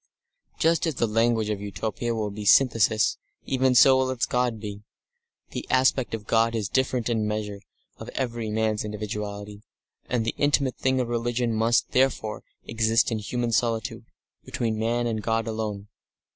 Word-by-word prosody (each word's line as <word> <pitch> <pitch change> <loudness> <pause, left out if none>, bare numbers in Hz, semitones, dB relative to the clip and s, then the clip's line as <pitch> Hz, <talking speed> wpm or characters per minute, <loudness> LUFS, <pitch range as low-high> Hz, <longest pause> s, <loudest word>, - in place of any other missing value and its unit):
Just 165 +1 +2
as 160 - -2
the 120 - +1
language 115 0 +1
of 100 -1 -3
Utopia 110 +4 -3
will 105 -2 -2
be 105 +1 -7
a - - -6
synthesis, 115 -2 +4 0.3
even 130 -1 +2
so 130 +2 +7
will 130 0 +1
its 130 -2 0
God 125 -3 0
be. 105 -1 -7 0.7
The - - -5
aspect 130 -2 +2
of 105 -2 -9
God 115 +1 +2
is 105 -3 -1
different 130 -3 0
in 115 -2 0
the 105 - 0
measure 105 -1 -4 0.4
of - - -9
every 120 -4 -2
man's 110 0 0
individuality, 105 -1 -5 0.5
and 120 -3 0
the 115 - -1
intimate 145 -2 +2
thing 130 0 +1
of 125 - 0
religion 120 0 -1
must, 115 +2 +2
therefore, 125 -5 +1 0.2
exist 115 +1 +2
in 110 - -1
human 120 +3 -2
solitude, 115 -1 -1 0.4
between 110 -2 -2
man 120 +2 0
and 110 -2 -1
God 115 0 0
alone. 110 -3 -4
115 Hz, 170 wpm, -25 LUFS, 105-125 Hz, 0.7 s, so